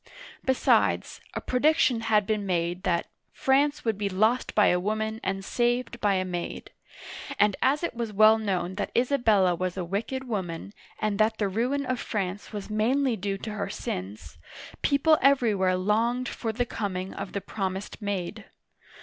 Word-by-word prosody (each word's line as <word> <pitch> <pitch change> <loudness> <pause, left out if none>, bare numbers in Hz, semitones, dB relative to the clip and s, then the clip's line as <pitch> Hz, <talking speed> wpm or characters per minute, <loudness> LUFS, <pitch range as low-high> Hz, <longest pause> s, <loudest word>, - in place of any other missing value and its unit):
Be 260 - +2
sides, - - +2
a - - -2
prediction 285 -1 +2
had 215 -2 +2
been 215 -1 -1
made 175 -1 -1
that 170 -2 +1 0.2
" - - -48
France 285 +2 +3
would 220 -3 0
be 200 -1 0
lost 220 +6 +1
by 210 - +5
a 180 - +2
Woman 220 +3 -2
and 195 0 -2
saved 240 +1 0
by 205 -2 +3
a 185 0 0
Maid," 175 -1 -5 0.7
and 205 -1 +4
as 285 +5 +2
it 340 - -1
was 230 -2 -3
well 215 +2 +6
known 185 -4 -1
that - - -2
Isabella 230 -8 +3
was 185 +1 -3
a 180 - -2
wicked 230 +8 -3
woman, 190 -4 -4 0.2
and 215 -1 -1
that 220 +1 +3
the 205 - +1
ruin 250 +8 -1
of 255 -1 -1
France 200 -2 -3
was 205 -2 -6
mainly 240 +4 +1
due 195 0 -3
to 215 +2 -6
her 205 -1 -3
sins, 90 -4 -6 0.4
people 300 +2 +4
everywhere 220 -9 +3
longed 230 +6 +1
for 225 - -3
the 245 +3 -1
coming 190 -5 -4
of 195 -1 -6
the 200 - -1
promised 195 +1 -4
Maid. 200 0 -3
215 Hz, 175 wpm, -27 LUFS, 190-240 Hz, 0.7 s, well